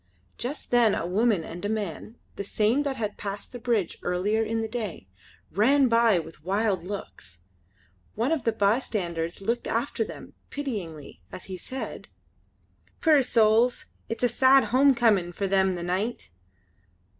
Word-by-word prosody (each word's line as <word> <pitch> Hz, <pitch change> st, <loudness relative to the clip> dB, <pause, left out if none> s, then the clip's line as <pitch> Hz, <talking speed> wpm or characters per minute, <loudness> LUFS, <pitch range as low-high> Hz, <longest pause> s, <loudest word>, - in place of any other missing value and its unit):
Just 260 Hz, +6 st, -5 dB
then 235 Hz, -4 st, +4 dB
a -, -, -2 dB
woman 200 Hz, 0 st, +2 dB
and 170 Hz, +3 st, -8 dB
a 205 Hz, -, -1 dB
man, 215 Hz, 0 st, -4 dB, 0.2 s
the -, -, -4 dB
same 215 Hz, +6 st, +1 dB
that 280 Hz, -2 st, -2 dB
had 210 Hz, -2 st, -4 dB
passed 200 Hz, 0 st, -5 dB
the 245 Hz, -, -7 dB
bridge 230 Hz, -7 st, -1 dB
earlier 195 Hz, +5 st, 0 dB
in 225 Hz, +1 st, -1 dB
the 225 Hz, -, -2 dB
day, 215 Hz, -, -5 dB, 0.4 s
ran 265 Hz, +7 st, +4 dB
by 230 Hz, -4 st, +4 dB
with 160 Hz, -2 st, -7 dB
wild 195 Hz, 0 st, 0 dB
looks. 175 Hz, -, -8 dB, 0.7 s
One 235 Hz, +7 st, 0 dB
of 315 Hz, -6 st, 0 dB
the 230 Hz, -, +2 dB
bystanders 200 Hz, -6 st, -1 dB
looked 235 Hz, +4 st, -1 dB
after 230 Hz, 0 st, -1 dB
them -, -, -10 dB, 0.2 s
pityingly 195 Hz, -, -6 dB
as 180 Hz, -, -9 dB
he 190 Hz, -, -6 dB
said: 260 Hz, +9 st, -7 dB, 0.9 s
"Puir 310 Hz, -4 st, +5 dB
souls. 230 Hz, 0 st, +3 dB, 0.2 s
It's 230 Hz, -, -4 dB
a -, -, +6 dB
sad 260 Hz, +3 st, +5 dB
home 270 Hz, +1 st, +5 dB
comin' 205 Hz, -7 st, +2 dB
for 200 Hz, -, -2 dB
them 190 Hz, -1 st, +2 dB
the 175 Hz, -1 st, -5 dB
nicht." 185 Hz, -, -2 dB
215 Hz, 155 wpm, -26 LUFS, 185-240 Hz, 0.9 s, a